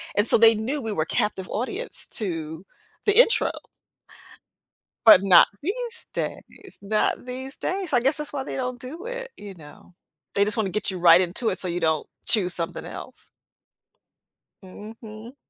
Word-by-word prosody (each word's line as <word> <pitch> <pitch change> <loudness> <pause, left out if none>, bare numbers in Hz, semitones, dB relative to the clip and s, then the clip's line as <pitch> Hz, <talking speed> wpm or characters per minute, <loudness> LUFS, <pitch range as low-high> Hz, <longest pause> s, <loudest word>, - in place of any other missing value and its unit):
And 205 - +3
so - - +7
they 225 0 +6
knew 265 +7 -3
we 225 - -4
were 155 -3 -1
captive 190 +1 -2
audience 320 - -4
to 165 -5 -4 0.4
the 415 0 +2
intro. - - +4 1.5
But 215 -4 +9
not 185 -3 +7
these 470 +7 -4
days, 390 -2 -7
not 215 +4 -1
these 260 +2 -7
days. 370 -5 -3
I 245 - +5
guess 270 +4 +1
that's 300 -1 -6
why 275 -2 -3
they - - -6
don't 250 -1 -4
do 320 - -9
it, - - -6
you 205 -1 -10
know? 160 +1 -16 0.4
They 200 - +3
just 210 +2 0
wanna 215 -3 0
get 210 +2 -2
you 190 - -4
right 170 0 +6
into 185 +6 -1
it - - -3
so 185 - -2
you 175 0 -2
don't 160 -2 0 0.2
choose 190 -5 +3
something 165 -1 -4
else. - - -10 1.3
Mhm. 215 +4 -11
220 Hz, 165 wpm, -24 LUFS, 185-270 Hz, 1.5 s, But